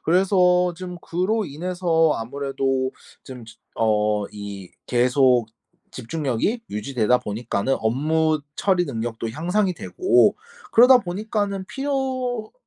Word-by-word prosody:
그래서 180 0 +3
좀 180 0 -8
그로 195 +7 -1
인해서 165 +1 0
아무래도 135 +1 -2 0.3
좀 125 -3 -10
즈 110 - -14 0.2
어 105 -2 +1
이 100 -3 -8 0.2
계속 125 -1 +3 0.5
집중력이 155 - -2
유지되다 115 +2 0
보니까는 110 +3 -2
업무 155 +7 +1 0.2
처리 185 -3 +2
능력도 115 -4 -4
향상이 180 - 0
되고 365 - +2 0.4
그러다 250 +2 +7
보니까는 200 0 -3
필요 260 -4 -3
160 Hz, 245 characters per minute, -22 LUFS, 120-190 Hz, 0.5 s, 그러다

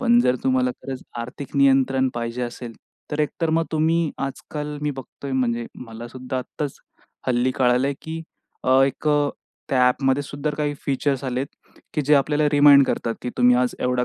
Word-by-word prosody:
पण 240 -2 +5
जर 125 - +2
तुम्हाला 130 -1 +2
खरंच 135 -1 -6 0.2
आर्थिक 125 +4 -7
नियंत्रण 135 -1 +4
पाहिजे 120 +1 -3
असेल, 120 -1 -5 0.4
तर 150 +1 -1
एक 150 - +2
तर 165 -1 +1
मग 165 - +2
तुम्ही 160 +1 +2 0.2
आजकाल 150 +2 -6
मी 150 - 0
बघतोय 135 +1 -8
म्हणजे 120 -2 0 0.2
मलासुद्धा 120 +3 -6
आत्ताच 135 +3 -5 0.5
हल्ली 125 +1 +2
कळालं 125 +2 +2
की 160 0 -5 0.4
अ, 130 +1 +5
एक 135 +3 -3
अ, 145 -1 +3 0.4
त्या 135 - +2
ॲपमध्येसुद्धा 140 +3 0
काही 145 -1 -1
फीचर्स 140 0 0
आलेत 130 +2 -1 0.5
की 150 - +1
जे 150 +2 +5
आपल्याला 150 +1 +3
रिमाइंड 145 -1 +8
करतात 115 - -1
की 125 - -3
तुम्ही 125 0 +6
आज 125 0 +1
एवढा 125 0 +1
135 Hz, 165 wpm, -23 LUFS, 125-145 Hz, 0.5 s, रिमाइंड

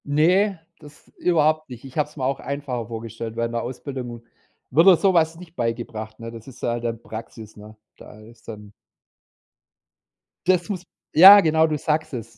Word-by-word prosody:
Ne, 180 +7 +2 0.2
das 150 -1 -17
überhaupt 155 -3 +1
nicht. 125 -2 -10
Ich 135 +1 -12
habe 150 -1 0
es 150 - -21
mir 135 - -4
auch 135 +1 -1
einfacher 135 -5 -5
vorgestellt 115 0 -7
während 115 0 -2
’ner 120 - -1
Ausbildung 125 -1 -7 0.5
wird 165 +7 +5
dir 190 - +9
so 190 +3 +2
was 165 -1 +2
nicht 170 0 -14
beigebracht, 115 -2 -4
ne? 115 0 -8
Das 115 0 -12
ist 130 - -14
da - - 0
halt 120 0 -4
dann 115 -1 -3
Praxis, 110 -1 -10
ne? 105 +1 -13 0.2
Da 105 - -14
ist 115 +1 -18
dann 105 -2 -10 1.7
das 180 +1 +2
muss 185 -4 -4 0.3
ja, 195 +5 +10
genau, 160 -2 +3
du 155 -1 -2
sagst 155 +1 -2
es. 115 -2 -8
130 Hz, 185 wpm, -22 LUFS, 115-160 Hz, 1.7 s, ja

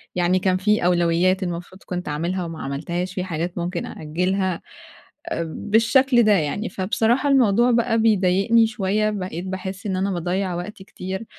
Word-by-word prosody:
يعني 180 +1 +2
كان 185 0 +1
في 210 -1 +1
أولويّات 175 +2 +2
المفروض 175 +2 -6
كنت 180 0 -5
أعملها 170 +5 -2
وما 165 -1 -7
عملتهاش، 170 +7 -3
في 185 -1 -2
حاجات 170 0 -4
ممكن 175 0 -3
أأجلها 180 +3 -2 0.8
بالشكل 230 - +3
ده 215 - +4
يعني، 195 +3 0
فبصراحة 225 +8 +1
الموضوع 240 -2 +4
بقى 235 -1 +2
بيضايقني 215 +1 +3
شوية، 215 -1 0
بقيت 185 -4 -4
باحِسّ 190 +1 -5
إن 195 -2 -1
أنا 195 +1 0
باضيَّع 180 +1 -2
وقتي 190 +3 -7
كتير، 190 +3 -6
190 Hz, 150 wpm, -22 LUFS, 175-210 Hz, 0.8 s, ده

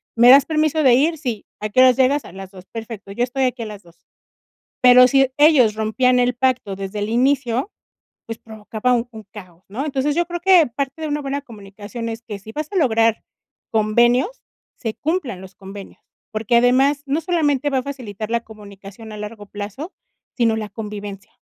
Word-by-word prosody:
"¿Me 235 +1 +6
das 275 +2 +8
permiso 310 0 +1
de 255 -3 +6
ir?". 315 +6 +2
"Sí, 245 -8 -5
¿a 215 - -4
qué 210 - 0
horas 255 -1 +6
llegas?". 270 +2 +2
"A - - -11
las 190 0 -10
2:00". 185 -2 -13
"Perfecto, 225 -3 -8
yo 240 +5 -1
estoy 260 +2 -1
aquí 250 -2 -2
a - - -6
las 210 -1 -9
2:00". 170 -1 -23 0.8
Pero 250 0 +8
si 270 0 +3
ellos 285 -8 +5
rompían 240 +4 +1
el 250 0 +2
pacto, 250 -6 0
desde 195 +1 -6
el 205 +1 -2
inicio, 255 - +1 0.5
pues, 225 0 -7
provocaba 220 +2 -3
un 240 0 0
un 220 -2 -10
caos, 185 -4 -13
¿no? 245 +9 -4
Entonces, 290 0 -1
yo 345 - +1
creo 345 +1 -5
que 360 -3 +6
parte 275 +5 -5
de - - -2
una 295 0 -2
buena 280 0 -3
comunicación 215 -1 -8
es 225 +1 -7
que 210 -3 -7
si 215 +3 -11
vas 305 +4 -5
a - - -7
lograr 230 - +2 0.5
convenios, 240 - +2 0.4
se 225 -3 -4
cumplan 290 - -3
los 190 0 -12
convenios, 195 +1 -11 0.3
porque 220 +2 0
además, 265 +4 +3
no 285 +4 -1
solamente 295 -5 0
va 270 -2 0
a - - -5
facilitar 230 -6 -7
la 235 - +2
comunicación 205 0 -12
a 210 - -8
largo 210 0 -8
plazo, 210 - -7 0.4
sino 230 -3 +2
la 215 -1 -4
convivencia. 205 -3 -8
240 Hz, 195 wpm, -20 LUFS, 210-275 Hz, 0.8 s, das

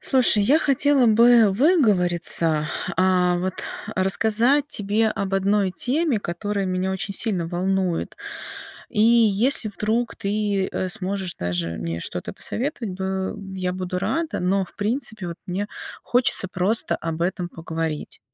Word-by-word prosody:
Слушай, 245 -6 +7
я 280 +9 +4
хотела 275 -3 +2
бы 230 0 +5
выговориться, 180 - +2 0.3
а, 180 -1 +2
вот 185 +1 -3 0.4
рассказать 225 +9 +2
тебе 215 -1 0
об 200 -3 -3
одной 195 0 +1
теме, 265 - -1
которая 200 +2 -4
меня 185 +1 -2
очень 190 +1 -3
сильно 195 -8 -1
волнует. 180 0 -2 0.7
И 210 - -1
если 230 +1 +4
вдруг 220 +3 -2
ты, 200 -1 -1
э, 185 - -3
сможешь 190 -1 -3
даже 90 -1 -3
мне 85 0 -4
что-то - - -6
посоветовать 235 -6 -4
бы 190 0 -3 0.2
я 180 -1 -2
буду 185 0 -4
рада, 310 - -2
но, 190 +2 0
в - - -18
принципе, 215 -3 -2
вот 170 - -7
мне 190 +3 -3 0.4
хочется 245 -5 +3
просто 195 +5 +1
об 165 0 -4
этом 180 0 -2
поговорить. 160 -2 -5
195 Hz, 135 wpm, -22 LUFS, 180-225 Hz, 0.7 s, Слушай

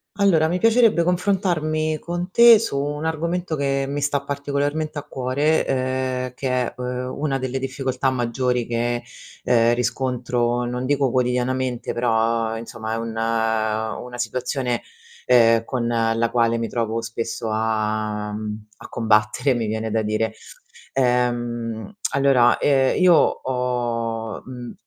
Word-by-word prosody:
Allora 170 -6 +3
mi 180 - 0
piacerebbe 225 -5 +4
confrontarmi 170 -4 0
con 175 +1 -4
te 235 0 +8
su 225 -11 -2
un 145 +2 -2
argomento 165 +1 -2
che 135 -1 0
mi 145 +1 -3
sta 140 0 0
particolarmente 145 +2 -2
a - - -9
cuore, 140 +5 0
ehm, 130 -1 -1
che 130 +1 -3
è, 125 -1 0
uhm, 125 0 -4
una 140 -2 -1
delle 130 0 -3
difficoltà 135 0 -1
maggiori 125 -1 -1
che, 120 0 -1 0.4
ehm, 115 -1 +4
riscontro 120 -1 -1
non 125 +1 -3
dico 140 0 +1
quotidianamente 125 0 -1
però 115 -1 +1
insomma 115 -1 -6
è - - -2
un 115 0 -4
una 110 +1 -1
situazione, 125 +1 -2 0.5
ehm, 115 -2 +5
con 120 0 -2
la 115 0 +1
quale 115 -1 +2
mi 115 0 -2
trovo 115 -1 -2
spesso 115 0 -4
a, 110 -1 -1
mhmm, 105 0 -5
a - - -11
combattere, 110 +3 +2
mi 115 -3 -2
viene 110 +1 -3
da 110 +1 +1
dire. 110 +1 -1 0.6
Ehm, 120 - -1 0.2
allora, 135 -3 +4
ehm, 135 +2 +2
io 180 -1 +7
ho, 120 -5 -1
mhmm, 125 -2 -8
125 Hz, 135 wpm, -22 LUFS, 115-140 Hz, 0.6 s, te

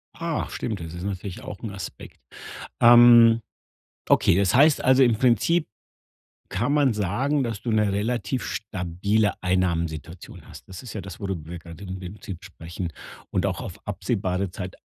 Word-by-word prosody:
Ah, 165 -2 -2
stimmt, 110 -4 -4
das 80 -1 -7
ist 85 +1 -7
natürlich 95 -1 -5
auch 100 - -8
'n 110 - -4
Aspekt. 95 -4 -9 0.6
Ähm, 120 -1 +8 0.7
okay, - - +4
das 100 +2 +2
heißt 145 +3 +5
also 130 +1 +5
im 120 -3 +4
Prinzip 130 - +2 0.8
kann 120 +9 -1
man 145 -5 +3
sagen, 125 +9 0
dass 115 -4 -4
du 120 - -2
'ne 105 -2 +2
relativ 110 +3 -1
stabile 100 +1 -1
Einnahmensituation 85 -3 -2
hast. - - -13
Das 95 -1 -9
ist 125 - -9
ja 105 - -4
das, 95 - -10
wo 100 - -3
du 95 -1 -2
wo 80 +1 -12
wir 85 - -6
gerade 85 +3 -11
im 95 0 -6
Prinzip 95 -1 -8
sprechen 85 +1 -7 0.4
und - - 0
auch - - -2
auf - - -7
absehbare 95 +1 -2
Zeit 90 0 -7
100 Hz, 170 wpm, -24 LUFS, 90-120 Hz, 0.8 s, Ähm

